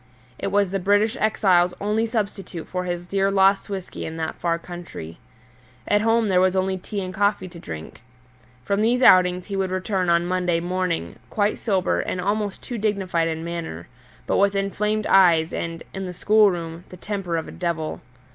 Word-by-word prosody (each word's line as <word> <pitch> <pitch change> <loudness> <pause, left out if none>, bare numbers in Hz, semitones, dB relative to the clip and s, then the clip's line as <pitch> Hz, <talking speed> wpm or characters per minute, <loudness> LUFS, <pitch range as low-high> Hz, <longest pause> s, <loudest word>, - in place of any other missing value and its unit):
It - - -2
was 200 -1 +1
the 195 - -1
British 205 +5 +2
exile's 180 -5 +3
only 215 +3 0
substitute 200 -6 -4
for 180 0 -3
his 175 0 -3
dear 195 +2 +1
lost 195 0 +3
whisky 190 -3 -5
in 160 0 -5
that 160 -1 -2
far 170 -1 -1
country. 170 - -9 0.7
At 205 0 +3
home 225 0 +2
there 185 -2 +3
was 185 0 +3
only 190 0 0
tea 200 +2 -5
and 185 0 -5
coffee 200 -1 +1
to 170 - -11
drink. 80 - -8 0.6
From 200 +8 0
these 245 +4 +2
outings 180 -2 +5
he 200 - -5
would 190 -1 0
return 185 -1 -1
on 170 0 +3
Monday 180 -1 0
morning, 180 0 -2
quite 210 0 0
sober 195 -5 +1
and 185 - -3
almost 205 +1 -2
too 240 -2 -5
dignified 190 -6 0
in 160 0 -3
manner, 165 - -5 0.4
but - - +1
with 200 0 +3
inflamed 210 +2 -1
eyes 170 -4 +5
and 165 0 -4
(in 190 -1 -4
the 180 - -6
schoolroom) 175 -6 +2
the 180 - -11
temper 190 -3 -3
of 160 - -4
a - - -8
devil. 165 -3 -3
185 Hz, 185 wpm, -23 LUFS, 175-205 Hz, 0.7 s, outings